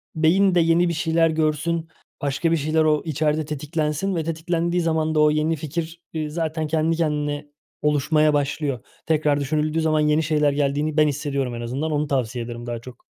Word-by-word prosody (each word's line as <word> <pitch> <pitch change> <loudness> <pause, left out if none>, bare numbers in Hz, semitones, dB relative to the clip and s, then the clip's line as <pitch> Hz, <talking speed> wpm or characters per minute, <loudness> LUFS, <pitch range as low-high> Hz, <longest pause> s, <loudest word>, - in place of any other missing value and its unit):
beyin 180 +4 +3
de 175 - +5
yeni 165 +1 +3
bir - - -1
şeyler 165 +1 +2
görsün, 160 +1 0 0.3
başka 145 +4 0
bir 165 - +3
şeyler 155 +2 +1
o 155 -1 +2
içeride 155 0 0
tetiklensin 150 +4 -2
ve 165 - -1
tetiklendiği 170 +2 -1
zaman 160 -1 0
da - - +3
o 150 - +5
yeni 155 +2 +1
fikir, 160 +2 -5
eee, 155 -2 -2
zaten 160 0 -2
kendi 160 +1 +1
kendine 150 -2 -1 0.3
oluşmaya 150 +1 +2
başlıyor. 145 -2 -1 0.3
Tekrar 150 -2 +2
düşünüldüğü 155 +3 0
zaman 155 -1 +2
yeni 150 +1 +2
şeyler 150 -1 +2
geldiğini 145 +2 0
ben 155 0 +5
hissediyorum 140 -3 -2
en 120 - -5
azından, 135 +7 -3
onu 150 0 0
tavsiye 125 -3 -1
ederim 120 0 -7
daha 120 -1 -3
çok. 120 +1 -13
155 Hz, 180 wpm, -23 LUFS, 145-160 Hz, 0.3 s, de